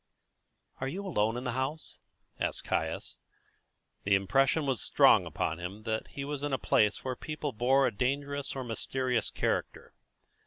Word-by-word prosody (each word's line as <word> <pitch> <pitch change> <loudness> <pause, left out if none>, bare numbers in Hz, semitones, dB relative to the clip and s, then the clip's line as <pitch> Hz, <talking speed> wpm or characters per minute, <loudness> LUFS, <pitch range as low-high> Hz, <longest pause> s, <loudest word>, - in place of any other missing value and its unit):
"Are 130 - -2
you 190 +8 -4
alone 115 - +1
in 125 - -4
the 125 - -1
house?" 130 +6 -3 0.4
asked - - -1
Caius. - - -2 0.8
The 100 0 +4
impression 135 +10 +2
was 135 -5 0
strong - - +5
upon 80 +2 -2
him 95 +5 -6
that 110 -1 -2
he 140 - -6
was 145 -1 -4
in 145 -1 -2
a - - +3
place 105 -3 +2
where 130 - -2
the - - -14
people 155 -2 -3
bore 130 +4 +3
a 125 - +2
dangerous 140 +5 -1
or 135 - -3
mysterious 125 0 -1
character. - - -2
130 Hz, 165 wpm, -30 LUFS, 110-140 Hz, 0.8 s, strong